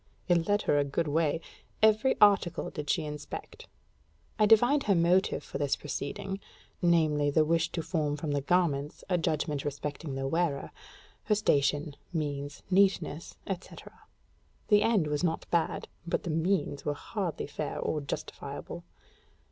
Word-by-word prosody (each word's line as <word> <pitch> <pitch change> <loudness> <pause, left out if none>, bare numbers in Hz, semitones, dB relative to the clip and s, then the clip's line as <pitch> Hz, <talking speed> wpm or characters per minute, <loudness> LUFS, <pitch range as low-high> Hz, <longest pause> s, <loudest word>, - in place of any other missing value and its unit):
It 170 -2 +3
led 205 0 +2
her 145 - +3
a - - +3
good 145 +4 -1
way: 160 +1 +1 0.4
every 220 +4 +5
article 195 -4 +4
did 150 -2 -6
she 165 -4 +1
inspect. 150 0 -7 0.7
I 215 - +5
divined 240 +7 +5
her 200 - +4
motive 175 +3 +2
for 140 - -6
this 145 -2 +1
proceeding; 150 +7 -4 0.4
viz., 155 -5 +3
the 155 - +5
wish 165 +1 +1
to 165 - -2
form 150 -4 -1
from 150 0 -3
the 145 -1 0
garments 150 -3 0
a 180 -2 +2
judgment 150 -3 -1
respecting 145 0 -4
the 135 0 -2
wearer, 160 -2 -1 0.5
her 210 - +3
station, 145 -6 +1 0.2
means, 145 -3 -3
neatness, 185 -5 +2
etc. 190 -2 -7 0.8
The 205 -1 +6
end 215 -6 +3
was 150 +2 -1
not 165 -2 0
bad, 170 -2 0 0.2
but - - -1
the 170 - -2
means 165 -2 0
were 145 - -1
hardly 185 +1 -3
fair 145 +1 -4
or 155 - -1
justifiable. 140 - -6
160 Hz, 150 wpm, -30 LUFS, 145-185 Hz, 0.8 s, The